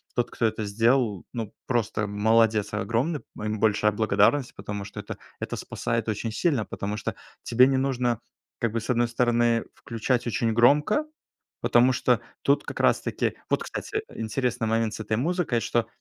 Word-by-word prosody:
тот, 120 Hz, -, 0 dB
кто 115 Hz, -, -1 dB
это 110 Hz, 0 st, 0 dB
сделал, 115 Hz, -1 st, +1 dB
ну 115 Hz, -3 st, -4 dB
просто 110 Hz, -3 st, 0 dB
молодец 105 Hz, 0 st, +2 dB
огромный, 115 Hz, -, 0 dB, 0.2 s
м, -, -, -6 dB
ему 105 Hz, 0 st, -2 dB
большая 105 Hz, -1 st, +3 dB
благодарность, 115 Hz, +5 st, +2 dB
потому 100 Hz, 0 st, -5 dB
что -, -, -7 dB
это -, -, -7 dB, 0.2 s
это -, -, -3 dB
спасает 115 Hz, -1 st, -2 dB
очень 110 Hz, +1 st, -2 dB
сильно. 140 Hz, -1 st, +1 dB
Потому 100 Hz, +2 st, -4 dB
что 105 Hz, -, -4 dB, 0.3 s
тебе 125 Hz, +2 st, +5 dB
не 135 Hz, -, +1 dB
нужно 125 Hz, -3 st, 0 dB, 0.4 s
как 115 Hz, -2 st, 0 dB
бы, 115 Hz, -, 0 dB
с 115 Hz, -, -2 dB
одной 120 Hz, 0 st, +2 dB
стороны, 120 Hz, -1 st, +2 dB
включать 120 Hz, +2 st, -2 dB
очень 115 Hz, 0 st, 0 dB
громко. 150 Hz, -, +4 dB, 0.6 s
Потому 125 Hz, +2 st, +4 dB
что 125 Hz, -2 st, +2 dB, 0.2 s
тут 140 Hz, +1 st, +3 dB
как -, -, -6 dB
раз-таки -, -, +1 dB, 0.2 s
Вот, -, -, +1 dB
кстати, 425 Hz, -, -4 dB
интересный 115 Hz, +1 st, -1 dB
момент 115 Hz, 0 st, +1 dB
с 105 Hz, -, -7 dB
этой 110 Hz, 0 st, -1 dB
музыкой, 155 Hz, -4 st, 0 dB
что 115 Hz, -1 st, 0 dB
115 Hz, 170 wpm, -26 LUFS, 110-125 Hz, 0.6 s, тебе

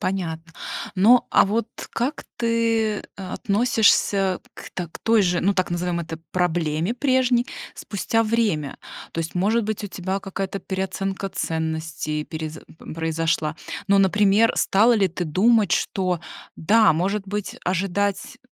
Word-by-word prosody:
Понятно. 165 Hz, -3 st, -3 dB, 0.4 s
Но, 220 Hz, +6 st, +5 dB
а -, -, +6 dB
вот 220 Hz, +3 st, -1 dB, 0.2 s
как 255 Hz, +6 st, -2 dB
ты 230 Hz, -2 st, +1 dB, 0.2 s
относишься 200 Hz, -1 st, +2 dB
к -, -, -10 dB
та 180 Hz, -2 st, -4 dB
к -, -, -11 dB
той 225 Hz, -2 st, +3 dB
же, 180 Hz, -2 st, +1 dB
ну, 200 Hz, -, +2 dB
так 185 Hz, -2 st, 0 dB
назовем 175 Hz, 0 st, -1 dB
это, 160 Hz, -1 st, -6 dB
проблеме 175 Hz, +1 st, 0 dB
прежней 255 Hz, -2 st, +2 dB, 0.3 s
спустя 225 Hz, +3 st, -1 dB
время? 215 Hz, -, 0 dB, 0.3 s
То -, -, -6 dB
есть, 165 Hz, +1 st, -5 dB
может 210 Hz, +5 st, +2 dB
быть, 215 Hz, 0 st, -3 dB
у -, -, -2 dB
тебя 190 Hz, 0 st, -3 dB
какая-то 195 Hz, 0 st, -4 dB
переоценка 190 Hz, +1 st, -3 dB
ценностей 160 Hz, -2 st, -3 dB
перез 160 Hz, -1 st, -6 dB, 0.3 s
произошла? 160 Hz, -1 st, -1 dB, 0.3 s
Ну, 200 Hz, 0 st, +4 dB
например, 205 Hz, +3 st, +4 dB
стала 220 Hz, +5 st, +4 dB
ли 200 Hz, -4 st, +3 dB
ты 175 Hz, +1 st, -4 dB
думать, 205 Hz, +5 st, +3 dB
что 185 Hz, -3 st, 0 dB, 0.4 s
да, 215 Hz, +5 st, +4 dB
может 190 Hz, +6 st, 0 dB
быть, 205 Hz, 0 st, -4 dB
ожидать, 195 Hz, +5 st, -1 dB
195 Hz, 135 wpm, -23 LUFS, 170-215 Hz, 0.4 s, а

